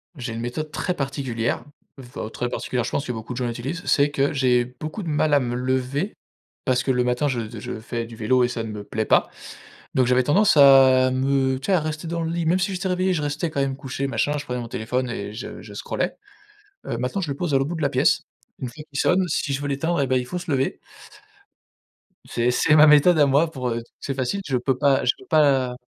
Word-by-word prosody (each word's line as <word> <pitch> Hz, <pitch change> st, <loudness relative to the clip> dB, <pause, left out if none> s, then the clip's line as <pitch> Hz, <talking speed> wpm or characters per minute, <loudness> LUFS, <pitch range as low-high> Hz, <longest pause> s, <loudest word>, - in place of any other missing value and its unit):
J'ai 120 Hz, -4 st, -5 dB
une 115 Hz, -, -5 dB
méthode 150 Hz, +6 st, -4 dB
très 180 Hz, -, -2 dB
particulière 135 Hz, -5 st, -2 dB, 0.4 s
enfin 120 Hz, -4 st, -7 dB
très 125 Hz, -, -3 dB
particulière, 125 Hz, 0 st, -2 dB
je 120 Hz, -, -4 dB
pense 140 Hz, -, -2 dB
que -, -, -1 dB
beaucoup 115 Hz, +1 st, -6 dB
de 120 Hz, -, -7 dB
gens 125 Hz, -, -1 dB
utilisent, 135 Hz, +10 st, -4 dB
c'est 145 Hz, 0 st, +3 dB
que 140 Hz, -1 st, +1 dB
j'ai 125 Hz, -4 st, +2 dB
beaucoup 155 Hz, -, -7 dB
de 175 Hz, -, -6 dB
mal 150 Hz, 0 st, +1 dB
à 145 Hz, -, +6 dB
me 120 Hz, -2 st, -2 dB
lever 130 Hz, +8 st, -1 dB, 0.5 s
parce 125 Hz, 0 st, +1 dB
que 135 Hz, -, +1 dB
le 125 Hz, -1 st, +2 dB
matin 125 Hz, +4 st, 0 dB
je 115 Hz, -4 st, -3 dB
je 110 Hz, -, -6 dB
fais 115 Hz, +1 st, -4 dB
du 115 Hz, 0 st, -11 dB
vélo 125 Hz, +3 st, +2 dB
et -, -, +3 dB
ça 120 Hz, -2 st, -3 dB
ne 110 Hz, -, -6 dB
me 105 Hz, -1 st, -6 dB
plaît 110 Hz, +2 st, -3 dB
pas. -, -, +3 dB, 0.7 s
Donc 130 Hz, -, +4 dB
j'avais 125 Hz, +1 st, +4 dB
tendance 190 Hz, +9 st, +4 dB
à 135 Hz, -2 st, +7 dB
me 130 Hz, 0 st, +1 dB
tu 135 Hz, -, -7 dB
sais 195 Hz, -, +2 dB
à 180 Hz, -, +4 dB
rester 155 Hz, +1 st, -4 dB
dans 170 Hz, +1 st, -2 dB
le 165 Hz, -, -2 dB
lit, 170 Hz, -1 st, -2 dB
même 180 Hz, +3 st, +2 dB
si 190 Hz, +2 st, -1 dB
j'étais 190 Hz, +1 st, -2 dB
réveillé 185 Hz, +1 st, +1 dB
je 155 Hz, -4 st, -1 dB
restais 145 Hz, +4 st, -2 dB
quand 140 Hz, -, -3 dB
même 135 Hz, -1 st, -1 dB
couché 135 Hz, 0 st, -4 dB
machin, 135 Hz, +4 st, 0 dB
je 145 Hz, -, -6 dB
prenais 125 Hz, 0 st, -3 dB
mon 115 Hz, -, -6 dB
téléphone 125 Hz, +3 st, -2 dB
et 100 Hz, -3 st, -5 dB
je 115 Hz, -, -7 dB
je -, -, -11 dB
scrollais. -, -, -3 dB, 0.7 s
Heu, 115 Hz, -, -3 dB
maintenant 125 Hz, +11 st, -2 dB
je 165 Hz, -, -3 dB
le 140 Hz, -, -4 dB
pose 175 Hz, -5 st, -2 dB
à -, -, +5 dB
l'autre 135 Hz, +2 st, -1 dB
bout 175 Hz, -, -3 dB
de 160 Hz, -, -5 dB
la 140 Hz, -, +2 dB
pièce, -, -, +2 dB, 0.4 s
une 130 Hz, -, -4 dB
fois 150 Hz, +6 st, -11 dB
qu'il 140 Hz, -2 st, -4 dB
sonne, 185 Hz, +1 st, +3 dB
si 145 Hz, -2 st, -1 dB
je 135 Hz, -, -2 dB
veux 145 Hz, -, -3 dB
l'éteindre, 150 Hz, +3 st, 0 dB
eh 135 Hz, -, 0 dB
ben, 130 Hz, 0 st, +2 dB
il 125 Hz, -, -2 dB
faut 180 Hz, +8 st, -5 dB
se 175 Hz, -3 st, -6 dB
lever 135 Hz, 0 st, 0 dB, 1.5 s
c'est 120 Hz, +1 st, 0 dB
c'est 150 Hz, -, +3 dB
ma 155 Hz, 0 st, +8 dB
méthode 150 Hz, +3 st, +6 dB
à 145 Hz, -, +6 dB
moi 140 Hz, +4 st, +3 dB
pour, 130 Hz, -4 st, -3 dB
heu 115 Hz, 0 st, -2 dB, 0.2 s
c'est 140 Hz, -, -3 dB
facile, 135 Hz, +9 st, -2 dB
je 135 Hz, -3 st, 0 dB
peux 125 Hz, +1 st, 0 dB
pas 135 Hz, 0 st, +3 dB
je 125 Hz, -, +5 dB
peux -, -, -16 dB
pas 135 Hz, -5 st, +3 dB
135 Hz, 255 wpm, -23 LUFS, 125-150 Hz, 1.5 s, ma